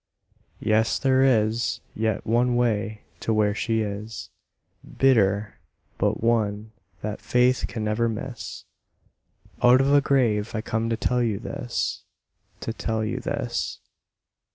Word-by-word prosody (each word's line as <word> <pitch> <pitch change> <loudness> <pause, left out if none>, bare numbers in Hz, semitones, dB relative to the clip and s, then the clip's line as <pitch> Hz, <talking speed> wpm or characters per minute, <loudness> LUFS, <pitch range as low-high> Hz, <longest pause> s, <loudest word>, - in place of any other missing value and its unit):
Yes, 110 +1 +2
there 130 -1 +3
is 115 -3 +2
yet 110 -2 -1
one 120 +2 +2
way 110 -3 0 0.2
to - - -2
where 105 -1 +2
she 110 +1 0
is, 105 +1 -5 0.7
Bitter, 105 -6 +3 0.4
but - - 0
one 110 -2 +1 0.3
that 105 0 -4
faith 125 +1 +2
may 110 - -2
never 110 +2 +1
miss. 110 -2 -6 1.0
Out 125 +1 +7
of 135 +1 +3
a 145 - +6
grave 120 -5 +1
I 110 - -1
come 115 0 -2
to 115 - 0
tell 125 +1 +1
you 110 -4 0
this 120 +2 -3 0.6
To 115 - -3
tell 110 -1 -2
you - - -2
this. - - -3
115 Hz, 130 wpm, -25 LUFS, 105-120 Hz, 1.0 s, Out